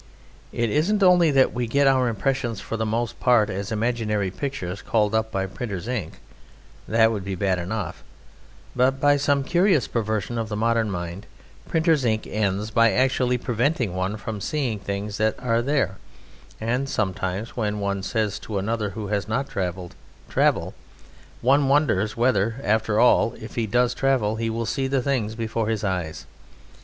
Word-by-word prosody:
It 115 Hz, -2 st, -1 dB
isn't 195 Hz, +8 st, +2 dB
only 180 Hz, -3 st, +6 dB
that 135 Hz, -2 st, +3 dB
we 120 Hz, -1 st, -2 dB
get 140 Hz, +5 st, +2 dB
our 130 Hz, -2 st, +4 dB
impressions 120 Hz, 0 st, -1 dB
for -, -, -5 dB
the 110 Hz, -1 st, -1 dB
most 115 Hz, +2 st, -2 dB
part 115 Hz, -4 st, +3 dB
as 100 Hz, +2 st, -4 dB
imaginary 110 Hz, -3 st, -1 dB
pictures 100 Hz, -6 st, -4 dB
called 105 Hz, -2 st, +1 dB
up 110 Hz, 0 st, 0 dB
by 95 Hz, -2 st, -1 dB
printer's 100 Hz, -1 st, -5 dB
ink 115 Hz, -10 st, -3 dB, 0.7 s
that 115 Hz, 0 st, +4 dB
would 105 Hz, -4 st, -3 dB
be 95 Hz, 0 st, -4 dB
bad 95 Hz, -1 st, 0 dB
enough; 105 Hz, +5 st, -4 dB, 0.7 s
but 130 Hz, +2 st, +2 dB
by 145 Hz, +1 st, +4 dB
some 140 Hz, 0 st, +1 dB
curious 175 Hz, -, +2 dB
perversion 110 Hz, 0 st, -2 dB
of 110 Hz, -1 st, -3 dB
the 105 Hz, -, -3 dB
modern 115 Hz, 0 st, +1 dB
mind, 90 Hz, +1 st, -5 dB, 0.4 s
printer's 160 Hz, -3 st, +2 dB
ink 110 Hz, -2 st, 0 dB
ends 105 Hz, 0 st, -1 dB
by 115 Hz, 0 st, +4 dB
actually 125 Hz, +1 st, +2 dB
preventing 120 Hz, -, 0 dB
one 95 Hz, +3 st, -2 dB
from 105 Hz, -1 st, -6 dB
seeing 130 Hz, -7 st, -1 dB
things 100 Hz, +1 st, -4 dB
that 110 Hz, 0 st, +1 dB
are 115 Hz, -2 st, +1 dB
there; 135 Hz, -7 st, 0 dB, 0.6 s
and 125 Hz, +5 st, -1 dB
sometimes, 100 Hz, -1 st, -2 dB
when 105 Hz, -3 st, -1 dB
one 100 Hz, -1 st, -1 dB
says 105 Hz, +1 st, -1 dB
to 105 Hz, -, -5 dB
another 105 Hz, +1 st, -1 dB
who 105 Hz, -2 st, -4 dB
has 100 Hz, -1 st, -1 dB
not 135 Hz, +6 st, -1 dB
travelled, 90 Hz, -2 st, -4 dB, 0.4 s
"Travel!" -, -, +1 dB, 0.7 s
one 135 Hz, +3 st, +4 dB
wonders 115 Hz, -8 st, +2 dB
whether, 115 Hz, -2 st, +2 dB
after 110 Hz, 0 st, +1 dB
all, 120 Hz, -2 st, +4 dB
if 110 Hz, -, -9 dB
he 115 Hz, -2 st, -1 dB
does 125 Hz, +3 st, +2 dB
travel, 125 Hz, -5 st, +1 dB
he 115 Hz, 0 st, -1 dB
will 115 Hz, +1 st, -2 dB
see 135 Hz, +4 st, -1 dB
the 135 Hz, -1 st, 0 dB
things 120 Hz, -6 st, -1 dB
before 115 Hz, -1 st, -2 dB
his 110 Hz, -1 st, -1 dB
eyes? 90 Hz, -5 st, -3 dB
110 Hz, 170 wpm, -24 LUFS, 105-125 Hz, 0.7 s, only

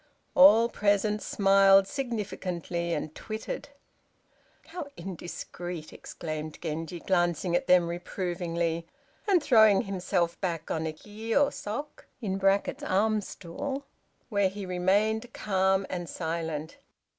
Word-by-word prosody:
All 255 Hz, -5 st, +8 dB
present 210 Hz, -1 st, +1 dB
smiled 195 Hz, -1 st, +5 dB
significantly, 185 Hz, -, -3 dB
and 155 Hz, 0 st, -3 dB
tittered. 215 Hz, -, -6 dB, 1.0 s
"How 325 Hz, -3 st, -6 dB
indiscreet!" 175 Hz, -2 st, -7 dB
exclaimed 155 Hz, -1 st, -6 dB
Genji, 165 Hz, +1 st, -4 dB
glancing 175 Hz, -1 st, +1 dB
at -, -, 0 dB
them 180 Hz, -1 st, +5 dB
reprovingly, 170 Hz, -1 st, -2 dB, 0.4 s
and 370 Hz, -6 st, +4 dB
throwing 220 Hz, -7 st, +6 dB
himself 180 Hz, -3 st, -1 dB
back 165 Hz, -4 st, -2 dB
on 160 Hz, 0 st, -1 dB
a -, -, -2 dB
kiô 220 Hz, -, 0 dB
sok 260 Hz, +9 st, -6 dB, 0.7 s
(arm 215 Hz, +3 st, +2 dB
stool), 270 Hz, +11 st, -6 dB, 0.4 s
where 200 Hz, -4 st, +2 dB
he 200 Hz, +1 st, -7 dB
remained 205 Hz, +6 st, +1 dB
calm 190 Hz, -1 st, +1 dB
and 175 Hz, -2 st, -5 dB
silent. 160 Hz, -2 st, -4 dB
190 Hz, 105 wpm, -28 LUFS, 170-215 Hz, 1.0 s, All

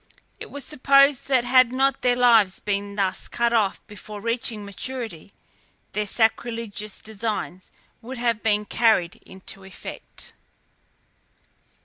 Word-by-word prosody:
It -, -, -8 dB
was 285 Hz, -2 st, -5 dB
supposed 275 Hz, -1 st, +4 dB
that 260 Hz, -3 st, +3 dB
had 255 Hz, 0 st, +5 dB
not 270 Hz, +1 st, +1 dB
their 245 Hz, -1 st, +3 dB
lives 230 Hz, -6 st, +4 dB
been 200 Hz, 0 st, -3 dB
thus 190 Hz, -2 st, -1 dB
cut 235 Hz, 0 st, 0 dB
off 210 Hz, -4 st, +1 dB
before 210 Hz, +1 st, -9 dB
reaching 230 Hz, -1 st, -2 dB
maturity, 205 Hz, -4 st, -6 dB, 0.6 s
their 210 Hz, 0 st, -1 dB
sacrilegious 225 Hz, -1 st, -1 dB
designs 210 Hz, -4 st, -4 dB, 0.3 s
would 250 Hz, +3 st, -7 dB
have 235 Hz, -2 st, 0 dB
been 210 Hz, -1 st, +1 dB
carried 215 Hz, -6 st, +2 dB
into 190 Hz, +1 st, -8 dB
effect. 190 Hz, 0 st, -10 dB
225 Hz, 120 wpm, -24 LUFS, 205-245 Hz, 0.6 s, had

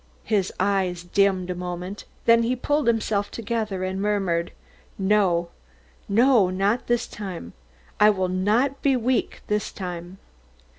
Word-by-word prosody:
His 200 Hz, -4 st, 0 dB
eyes 185 Hz, -3 st, 0 dB
dimmed 185 Hz, 0 st, +1 dB
a -, -, -1 dB
moment, 180 Hz, +2 st, -6 dB, 0.2 s
then 230 Hz, 0 st, +6 dB
he 235 Hz, +2 st, +1 dB
pulled 290 Hz, +2 st, 0 dB
himself 215 Hz, -3 st, +1 dB
together 220 Hz, -4 st, -3 dB
and 190 Hz, +1 st, -2 dB
murmured: 190 Hz, -5 st, 0 dB, 0.5 s
"No, 190 Hz, -4 st, +2 dB, 0.6 s
no, 230 Hz, -2 st, +4 dB
not 195 Hz, +6 st, 0 dB
this 240 Hz, -1 st, +1 dB
time. 185 Hz, -, -7 dB, 0.5 s
I 210 Hz, 0 st, +7 dB
will 190 Hz, -3 st, +1 dB
not 215 Hz, +10 st, +1 dB
be 275 Hz, -2 st, +3 dB
weak 250 Hz, +1 st, -1 dB
this 210 Hz, 0 st, -1 dB
time." 180 Hz, -1 st, -7 dB
200 Hz, 135 wpm, -24 LUFS, 185-225 Hz, 0.6 s, I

